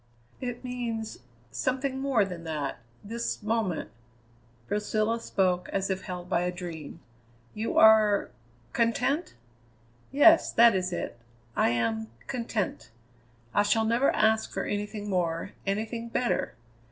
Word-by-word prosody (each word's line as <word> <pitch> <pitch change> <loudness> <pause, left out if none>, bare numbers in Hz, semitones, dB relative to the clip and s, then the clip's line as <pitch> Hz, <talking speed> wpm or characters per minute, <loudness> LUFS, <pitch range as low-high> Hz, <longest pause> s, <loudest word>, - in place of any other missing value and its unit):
"It 245 -1 -4
means 235 -3 -4 0.3
something 265 +1 -1
more 265 -6 +2
than 180 -3 -7
that 150 -5 -3 0.2
this 230 +1 -4
moment 210 - -1 0.4
" 120 0 -32
Priscilla 215 +2 0
spoke 185 -5 0
as 195 0 -1
if 190 0 -2
held 180 -1 -6
by 170 - +1
a 180 0 0
dream. 170 -5 -8 0.5
"You 220 +2 -2
are 215 -2 +6 0.4
content?" 250 - +1 0.8
"Yes. 320 +4 +6
That 235 -1 +7
is 185 -1 -1
it. 145 -8 -4 0.4
I - - +3
am 115 -2 0 0.2
content. 230 -5 -3 0.6
I - - +4
shall 220 +2 +2
never 235 +4 +3
ask 220 +1 +2
for - - -2
anything 205 0 -3
more, 175 -1 -1 0.2
anything 225 +4 -2
better. 245 +1 0
210 Hz, 130 wpm, -28 LUFS, 180-235 Hz, 0.8 s, That